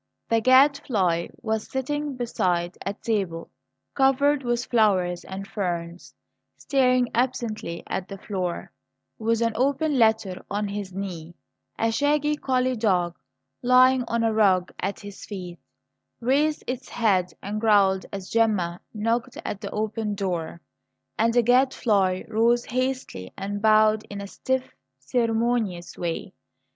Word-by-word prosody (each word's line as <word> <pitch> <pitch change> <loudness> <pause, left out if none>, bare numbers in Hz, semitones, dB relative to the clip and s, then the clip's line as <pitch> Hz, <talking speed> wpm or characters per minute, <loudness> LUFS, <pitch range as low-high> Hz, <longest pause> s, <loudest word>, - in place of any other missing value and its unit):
The 230 0 +3
Gadfly 250 -9 +3 0.2
was 220 -1 -2
sitting 290 +2 -2
beside 180 -7 -1
a 200 - -3
table 195 -8 -2 0.4
covered 275 +1 +3
with 240 -1 -1
flowers 185 -7 +2
and 190 +1 -7
ferns, 175 -3 -4 0.4
staring 255 -3 +2
absently 230 -8 -2
at 190 - -4
the 195 - -7
floor, 185 -3 -4 0.5
with 230 +1 +1
an 230 - +2
open 280 +3 +1
letter 220 -5 +2
on 205 0 -2
his 200 -1 -5
knee. 175 -3 -6 0.4
A 225 0 +1
shaggy 295 +4 +1
collie 255 -3 0
dog, 180 -6 +1 0.5
lying 255 +1 +5
on 235 0 0
a 225 -1 +2
rug 190 -4 +3
at 195 +1 -3
his 205 -1 -10
feet, 180 -4 -7 0.6
raised 285 +5 +1
its 255 +1 -5
head 190 -6 +1
and 210 +2 -3
growled 200 -4 +3
as 195 -2 -6
Gemma 205 -7 +1
knocked 230 +3 -1
at 200 - -4
the 200 - -5
open 215 0 -2
door, 175 -4 -3 0.6
and 230 +1 +3
the 240 0 +3
Gadfly 225 -7 +2
rose 230 +2 +2
hastily 255 - -3
and 205 +1 -4
bowed 215 0 +4
in 205 - -6
a 200 - -5
stiff, 260 +6 -3 0.2
ceremonious 225 - -1
way. 170 -2 -4
220 Hz, 130 wpm, -25 LUFS, 190-250 Hz, 0.6 s, lying